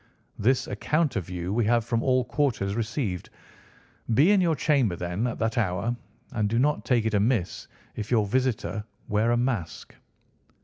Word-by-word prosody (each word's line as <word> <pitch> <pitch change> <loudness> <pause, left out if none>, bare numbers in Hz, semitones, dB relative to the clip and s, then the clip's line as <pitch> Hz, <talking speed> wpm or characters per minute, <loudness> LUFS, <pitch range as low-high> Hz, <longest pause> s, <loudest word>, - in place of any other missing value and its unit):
This 130 +4 +2
account 155 -2 0
of 90 -4 -3
you 90 +1 -3
we 120 +2 +2
have 115 0 +2
from 115 -1 0
all 130 -1 +2
quarters 120 -10 0
received. 110 - -3 0.9
Be 155 - +5
in 200 -2 +5
your 165 -3 +2
chamber 135 - +2
then 90 +7 -2
at 120 - -4
that 115 +1 0
hour, 100 +3 0 0.4
and 105 -2 0
do 115 - 0
not 145 +4 +2
take 120 -4 +2
it 110 - 0
amiss 105 -2 0 0.3
if 105 -1 -5
your 110 -4 +3
visitor 110 -4 -1 0.3
wear 105 +3 +2
a 120 - +3
mask." 120 -8 -2
115 Hz, 170 wpm, -26 LUFS, 105-130 Hz, 0.9 s, Be